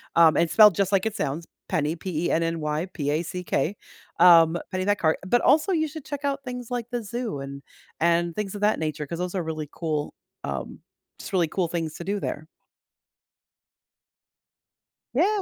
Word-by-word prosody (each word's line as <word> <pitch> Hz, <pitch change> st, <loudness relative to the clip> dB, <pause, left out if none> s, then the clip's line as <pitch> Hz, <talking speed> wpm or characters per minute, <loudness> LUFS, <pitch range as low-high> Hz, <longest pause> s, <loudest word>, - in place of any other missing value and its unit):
Um, 165 Hz, -2 st, +6 dB
and 165 Hz, -1 st, +2 dB
spelled 210 Hz, -4 st, +7 dB
just 195 Hz, +1 st, +1 dB
like 195 Hz, +1 st, +2 dB
it 220 Hz, -1 st, -1 dB
sounds, 165 Hz, -2 st, -3 dB, 0.2 s
Penny, 160 Hz, -2 st, 0 dB
P-E-N-N-Y 165 Hz, -1 st, -1 dB
P-A-C-K, 165 Hz, +3 st, -1 dB, 0.4 s
um, 170 Hz, -1 st, +7 dB, 0.2 s
Pennypack 195 Hz, +2 st, +1 dB
car 160 Hz, -4 st, +2 dB
but 240 Hz, +5 st, +4 dB
also 305 Hz, +6 st, +4 dB
you 315 Hz, -3 st, +1 dB
should 310 Hz, -1 st, -8 dB
check 285 Hz, -1 st, -5 dB
out 280 Hz, 0 st, 0 dB
things 250 Hz, -2 st, -6 dB
like 240 Hz, -1 st, -2 dB
the 240 Hz, -2 st, -2 dB
zoo 225 Hz, -, -4 dB
and 140 Hz, 0 st, -7 dB, 0.4 s
and 170 Hz, 0 st, +2 dB
things 210 Hz, -1 st, -3 dB
of 205 Hz, -, -6 dB
that 210 Hz, +1 st, +2 dB
nature 155 Hz, -1 st, -3 dB
'cause 170 Hz, +3 st, -6 dB
those 180 Hz, +1 st, -3 dB
are 180 Hz, -, 0 dB
really 155 Hz, -2 st, -4 dB
cool, 155 Hz, -3 st, -3 dB, 0.3 s
um, 70 Hz, -2 st, -5 dB, 0.4 s
just -, -, -8 dB
really 180 Hz, -4 st, +2 dB
cool 175 Hz, +2 st, -1 dB
things 165 Hz, -2 st, -3 dB
to -, -, -7 dB
do 200 Hz, +3 st, -2 dB
there. 155 Hz, -4 st, -4 dB, 2.7 s
Yeah. 420 Hz, +1 st, +2 dB
175 Hz, 165 wpm, -25 LUFS, 160-210 Hz, 2.7 s, spelled